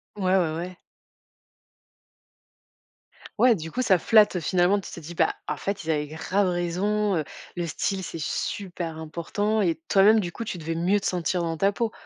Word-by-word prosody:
Ouais, 190 Hz, -2 st, +1 dB
ouais, 160 Hz, -3 st, +1 dB
ouais. 180 Hz, +1 st, -6 dB, 2.6 s
Ouais, 245 Hz, -2 st, +6 dB
du 160 Hz, -2 st, -7 dB
coup, 255 Hz, -, -1 dB
ça 195 Hz, -7 st, +4 dB
flatte, 210 Hz, +2 st, +5 dB
heu, -, -, +1 dB
finalement, 180 Hz, +5 st, +2 dB
tu -, -, -9 dB
t'es 170 Hz, -, -8 dB
dis: 170 Hz, +3 st, -9 dB
«Bah, -, -, +2 dB
en -, -, -2 dB
fait, 200 Hz, -2 st, -3 dB
ils 160 Hz, -, -6 dB
avaient 150 Hz, -1 st, +1 dB
grave 185 Hz, +6 st, 0 dB
raison, 190 Hz, +4 st, 0 dB
heu, 155 Hz, -, 0 dB, 0.3 s
le 175 Hz, -1 st, -2 dB
style, 190 Hz, +4 st, -2 dB
c'est 165 Hz, -, -6 dB
super 175 Hz, -1 st, -4 dB
important» 175 Hz, +7 st, -1 dB
et 170 Hz, -4 st, +2 dB
toi-même, 205 Hz, +3 st, +6 dB
du 175 Hz, -4 st, -3 dB
coup, 230 Hz, -, -6 dB
tu 200 Hz, -4 st, -5 dB
devais 165 Hz, 0 st, -4 dB
mieux 185 Hz, +5 st, +2 dB
te -, -, -8 dB
sentir 180 Hz, 0 st, -1 dB
dans 165 Hz, -1 st, -2 dB
ta 195 Hz, +3 st, +3 dB
peau? 225 Hz, +1 st, -2 dB
180 Hz, 190 wpm, -25 LUFS, 165-205 Hz, 2.6 s, Ouais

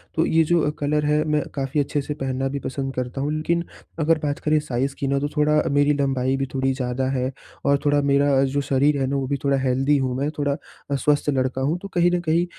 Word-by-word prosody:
तो 160 Hz, -, +2 dB
ये 165 Hz, 0 st, +3 dB
जो 175 Hz, 0 st, +4 dB
अ, 150 Hz, -, +1 dB
कलर 150 Hz, +1 st, 0 dB
है 150 Hz, +1 st, +2 dB
मैं 150 Hz, -1 st, +2 dB
काफ़ी 135 Hz, +1 st, -1 dB
अच्छे 145 Hz, +1 st, 0 dB
से 145 Hz, +2 st, -4 dB
पहनना 135 Hz, -2 st, -2 dB
भी -, -, -1 dB
पसंद 135 Hz, 0 st, -3 dB
करता 125 Hz, +1 st, -3 dB
हूँ 145 Hz, +2 st, -1 dB
लेकिन 170 Hz, +2 st, 0 dB, 0.4 s
अगर 160 Hz, +1 st, +3 dB
बात 145 Hz, -1 st, -1 dB
करें 155 Hz, 0 st, +2 dB
साइज़ 140 Hz, -1 st, -2 dB
की 140 Hz, -, -1 dB
ना 140 Hz, 0 st, +1 dB
तो 145 Hz, -, -1 dB
थोड़ा 150 Hz, 0 st, +3 dB
मेरी 145 Hz, +1 st, +3 dB
लम्बाई 135 Hz, -1 st, +1 dB
भी 135 Hz, -, -1 dB
थोड़ी 135 Hz, 0 st, +1 dB
ज़्यादा 130 Hz, 0 st, -2 dB
है, 130 Hz, -1 st, -1 dB, 0.3 s
और 140 Hz, 0 st, +3 dB
थोड़ा 145 Hz, 0 st, +3 dB
मेरा 140 Hz, -1 st, +4 dB
जो -, -, +2 dB
शरीर 140 Hz, +2 st, +2 dB
है 135 Hz, -, +1 dB
वो 135 Hz, -1 st, 0 dB
भी 140 Hz, +1 st, -1 dB
थोड़ा 140 Hz, -1 st, +2 dB
हेल्दी 135 Hz, +2 st, +2 dB
हूँ 130 Hz, -2 st, -1 dB
मैं, 140 Hz, +2 st, 0 dB
थोड़ा 145 Hz, -1 st, +1 dB, 0.4 s
स्वस्थ 145 Hz, +2 st, +1 dB
लड़का 130 Hz, -1 st, 0 dB
हूँ। 150 Hz, +6 st, 0 dB
तो 200 Hz, -, -6 dB
कहीं 175 Hz, 0 st, +3 dB
न 180 Hz, -, +1 dB
कहीं 165 Hz, +2 st, +3 dB
140 Hz, 240 wpm, -23 LUFS, 135-150 Hz, 0.4 s, जो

